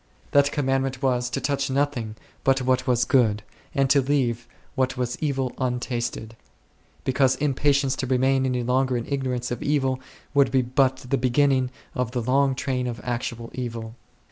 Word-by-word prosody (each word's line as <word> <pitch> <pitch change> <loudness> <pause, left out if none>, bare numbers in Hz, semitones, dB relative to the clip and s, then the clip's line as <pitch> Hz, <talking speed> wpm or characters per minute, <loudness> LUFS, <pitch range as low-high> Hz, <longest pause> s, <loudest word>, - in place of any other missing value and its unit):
That 140 0 +4
commandment 135 -1 -1
was, 125 -2 +1
to - - -2
touch 140 0 -1
nothing 130 -6 -1 0.3
but 135 -1 +3
what 130 +1 +1
was 125 -1 +3
Good, 110 -5 +2 0.3
and 135 -1 +3
to 140 - +5
leave 125 -4 0 0.3
what 130 0 0
was 125 -1 -1
evil 135 -4 -1
untasted; 120 -3 -2 0.7
because 130 0 +2
impatience 140 -1 +1
to 130 - -2
remain 130 +1 +2
any 125 -1 -1
longer 130 +1 +1
in 115 - -4
ignorance 130 -3 -2
of 120 - -3
evil 135 -3 +1 0.3
would 140 -2 +4
be 130 0 +2
but 130 +1 +1
the 135 +2 +1
beginning 130 0 +2 0.2
of 125 -2 -2
the 125 - -1
long 135 +2 +2
train 130 -1 -1
of 120 -1 -4
actual 120 -1 -4
evil. 115 -3 -5
130 Hz, 165 wpm, -24 LUFS, 125-135 Hz, 0.7 s, to